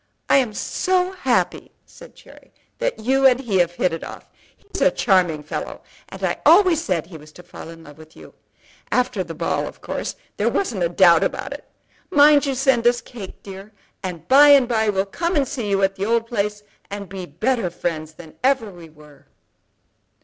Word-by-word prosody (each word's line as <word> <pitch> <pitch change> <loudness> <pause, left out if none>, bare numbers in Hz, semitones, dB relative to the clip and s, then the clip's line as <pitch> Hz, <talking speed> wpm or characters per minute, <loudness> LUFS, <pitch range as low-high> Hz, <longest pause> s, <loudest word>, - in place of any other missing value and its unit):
"I - - +6
am 250 -5 +1
so 370 0 0
happy," 380 -1 -1 0.2
said - - -16
Cherry, - - -18 0.3
"that - - -2
you 265 +4 +3
and 255 -1 +3
he 220 -8 -1
have 175 -1 +1
hit 175 0 0
it 165 - -5
off. - - -11 0.3
He's 405 - -9
a 280 - +5
charming 180 - +1
fellow, 150 - -6 0.3
and - - -10
I - - -1
always 345 -2 +5
said 170 -4 -1
he 170 -1 -11
was 155 0 -16
to 180 - -14
fall 175 -2 -11
in 165 0 -12
love 150 0 -15
with 160 0 -16
you. - - -14 0.6
After 250 -6 0
the 165 -2 -9
ball - - -2
of - - -11
course - - -5 0.2
there - - +1
wasn't 235 - -2
a 170 - +1
doubt 170 -2 +5
about - - -3
it. - - -12 0.4
Mind 295 -3 +5
you 270 - -1
send 255 -3 +2
us 240 0 +3
cake, 215 -7 -11
dear; 195 +2 -11 0.3
and 175 -3 -7
by 285 +2 +7
and 280 -4 +6
by 220 -3 +1
we'll 195 -1 0
come 340 - -3
and 280 -3 +1
see 240 -8 -4
you 195 0 +1
at 195 0 +2
the 195 - -3
old 230 +1 +1
place, 210 -2 -3 0.3
and 200 0 -6
be 185 -1 -8
better 240 -6 -1
friends 160 -2 -5
than 160 0 -14
ever 260 -5 +1
we 170 -3 -13
were." 150 -1 -19
205 Hz, 200 wpm, -21 LUFS, 175-270 Hz, 0.6 s, by